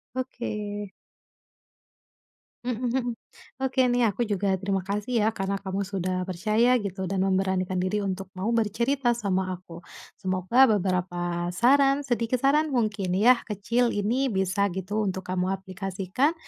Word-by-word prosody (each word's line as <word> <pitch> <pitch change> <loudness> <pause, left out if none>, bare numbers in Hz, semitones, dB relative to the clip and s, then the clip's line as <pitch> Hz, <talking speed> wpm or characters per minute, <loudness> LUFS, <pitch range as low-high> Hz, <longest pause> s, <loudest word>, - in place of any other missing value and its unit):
Oke. 210 -5 -4 1.7
Mhm 250 -1 0
mhm. 255 +1 0 0.6
Oke 260 -1 +2
nih, 245 -2 +3
aku 235 +5 -1
juga 200 -2 0
terima 195 0 -1
kasih 205 +5 -3
ya 215 - +3
karena 195 -2 -3
kamu 195 0 -2
sudah 185 -1 -2
percaya 215 +7 +2
gitu 190 -1 -4
dan 190 +1 -1
memberanikan 190 -1 +1
diri 185 +3 0
untuk 195 -1 -4
mau 190 +4 -2
bercerita 235 +3 +1
sama 190 -5 -1
aku. 175 -2 -10 0.4
Semoga 185 +7 +3
beberapa 175 -4 0
saran, 275 +7 +4
sedikit 240 -2 -1
saran 295 +1 +3
mungkin 205 -6 0
ya, 235 +6 +5
kecil, 230 +4 0
ini 225 +7 +1
bisa 190 0 +1
gitu 205 +3 -2
untuk 190 0 -2
kamu 185 +1 0
aplikasikan 195 - -1
200 Hz, 135 wpm, -26 LUFS, 185-235 Hz, 1.7 s, ya